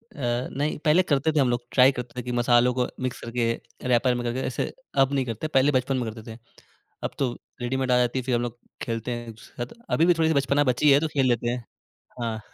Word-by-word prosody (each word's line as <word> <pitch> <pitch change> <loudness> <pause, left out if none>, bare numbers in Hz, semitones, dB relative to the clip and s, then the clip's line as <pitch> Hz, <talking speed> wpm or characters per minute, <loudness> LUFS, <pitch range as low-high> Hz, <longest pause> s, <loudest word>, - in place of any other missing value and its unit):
अ, 120 -2 -1
नहीं, 145 +3 -1
पहले 165 +5 +5
करते 150 -1 +1
थे 150 - +1
हम 130 -3 +3
लोग, 120 0 +1
ट्राइ 130 +1 +6
करते 125 -1 -6
थे - - -4
कि 125 - -3
मसालों 120 0 +3
को 125 0 0 0.2
मिक्स 130 - -3
करके 115 0 -1 0.4
रैपर 125 0 +3
में 120 - -3
करके 120 +2 -2
ऐसे 130 - -2 0.3
अब 135 +1 -2
नहीं 135 -2 +1
करते, 115 +5 -4
पहले 140 -1 +3
बचपन 130 0 +1
में 115 -3 -2
करते 110 0 -10
थे। - - -11 0.7
अब - - -2
तो 130 -3 +1 0.3
रेडीमेड 130 +1 -1
आ 125 - +5
जाती 125 +1 +1
है 130 - -4
फिर 125 -1 0
हम 120 - +1
लोग 120 0 -5 0.2
खेलते 115 +1 -3
हैं 120 0 -5
एक-दूसरे 115 +2 -8
के - - -15
साथ। 235 - -24
अभी 165 - +4
भी 175 - +5
थोड़ी-सी 160 -1 +2
बचपना 140 +1 +2
बची 145 +4 +4
है 140 - +7
तो 160 - -1
खेल 135 -2 +3
लेते 120 -1 +1
हैं। 125 0 -3 0.6
हाँ। 110 -2 -2
125 Hz, 250 wpm, -25 LUFS, 120-140 Hz, 0.7 s, है